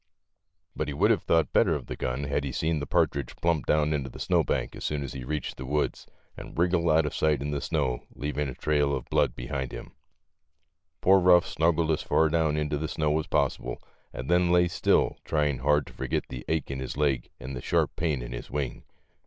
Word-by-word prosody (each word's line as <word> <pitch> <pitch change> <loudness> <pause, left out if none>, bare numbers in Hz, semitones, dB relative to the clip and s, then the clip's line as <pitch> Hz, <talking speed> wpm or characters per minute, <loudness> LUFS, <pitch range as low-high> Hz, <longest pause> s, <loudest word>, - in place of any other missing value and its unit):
But 75 - -2
he 70 - -4
would - - +4
have - - +2
thought 80 -3 +1
better - - +4
of - - -5
the - - -5
gun 65 +3 -3
had 70 0 -1
he 70 - -3
seen 80 +3 0
the 70 - -5
partridge 70 0 0
plump 85 -3 0
down 75 0 +2
into 70 -3 -2
a - - -11
snowbank - - 0
as - - -8
soon 75 -1 -1
as 70 - -6
he 65 - -6
reached 75 +3 -4
the 65 - -6
woods, 75 +2 -1 0.3
and - - -10
wriggle 85 0 +2
out 80 0 +4
of 75 - -3
sight 75 -3 +2
in 70 +2 -3
the 70 -1 -2
snow, 60 -2 -1
leaving 75 -1 -2
a 65 - -7
trail 75 -2 +1
of 60 - -6
blood - - +2
behind 65 0 -4
him. - - -8 1.1
Poor 95 +1 +5
Euff 90 0 +6
snuggled 80 0 +1
as 80 - 0
far 80 0 +2
down 80 -1 +1
into 75 -1 -1
the 80 - -2
snow 75 0 0
as 80 - -4
possible 60 0 -1 0.3
and 65 - -6
then 90 0 +3
lay 90 0 +4
still, 85 - +2
trying 75 -4 0
hard 75 +1 +2
to - - -13
forget - - -2
the 60 -1 -7
ache 80 -4 -1
in 65 - -4
his 65 +1 -5
leg 70 -5 +1
and 65 +1 -6
the 60 - -5
sharp - - +1
pain 75 -7 -1
in - - -7
his - - -7
wing. 70 -2 -3
75 Hz, 225 wpm, -27 LUFS, 65-80 Hz, 1.1 s, Euff